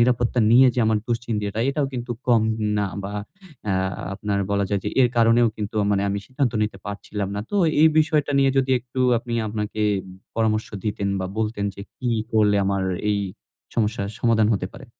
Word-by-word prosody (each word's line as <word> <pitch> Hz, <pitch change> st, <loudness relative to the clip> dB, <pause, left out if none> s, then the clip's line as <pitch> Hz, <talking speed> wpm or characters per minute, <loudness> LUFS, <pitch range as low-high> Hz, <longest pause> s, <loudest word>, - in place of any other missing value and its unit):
নিরাপত্তা 120 Hz, 0 st, +2 dB
নিয়ে 125 Hz, +3 st, +7 dB
যে 125 Hz, -, +1 dB
আমার 110 Hz, -1 st, +3 dB
দুশ্চিন্তি 115 Hz, -2 st, -1 dB
এটা 110 Hz, +2 st, -3 dB
এটাও 140 Hz, 0 st, 0 dB
কিন্তু 125 Hz, -1 st, -5 dB, 0.2 s
কম 120 Hz, -3 st, +4 dB, 0.4 s
না 105 Hz, -, +1 dB, 0.2 s
বা 100 Hz, -, -5 dB, 0.6 s
আ -, -, +2 dB, 0.4 s
আপনার 100 Hz, 0 st, -2 dB
বলা 100 Hz, 0 st, +1 dB
যায়। 100 Hz, -1 st, 0 dB
যে -, -, 0 dB
এর 125 Hz, -, +5 dB
কারণেও 115 Hz, +1 st, +5 dB
কিন্তু 105 Hz, 0 st, -5 dB
আ -, -, +1 dB
মানে 100 Hz, -1 st, +2 dB
আমি 100 Hz, 0 st, -1 dB
সিদ্ধান্ত 130 Hz, -3 st, -1 dB
নিতে 105 Hz, -2 st, -2 dB
পারছিলাম 100 Hz, 0 st, -4 dB
না। 100 Hz, -, -2 dB
তো 205 Hz, -, -1 dB, 0.3 s
এই 160 Hz, -, +8 dB
বিষয়টা 150 Hz, -2 st, +2 dB
নিয়ে 135 Hz, 0 st, +4 dB
যদি 135 Hz, 0 st, +1 dB
একটু 125 Hz, +2 st, -6 dB, 0.2 s
আপনি 120 Hz, 0 st, -5 dB
আপনাকে 105 Hz, 0 st, -3 dB, 0.5 s
পরামর্শ 110 Hz, -1 st, +1 dB, 0.2 s
দিতেন 100 Hz, -2 st, -1 dB
বা 95 Hz, -, -2 dB
বলতেন 110 Hz, -2 st, -1 dB
যে -, -, -10 dB, 0.2 s
কি 125 Hz, -, -3 dB, 0.2 s
করলে 105 Hz, -2 st, +4 dB
আমার 100 Hz, -1 st, 0 dB, 0.3 s
এই 100 Hz, -, 0 dB, 0.6 s
সমস্যার 105 Hz, -3 st, 0 dB
সমাধান 115 Hz, -2 st, +3 dB
হতে 95 Hz, -, -2 dB
পারে। -, -, -11 dB
110 Hz, 190 wpm, -23 LUFS, 105-120 Hz, 0.6 s, এই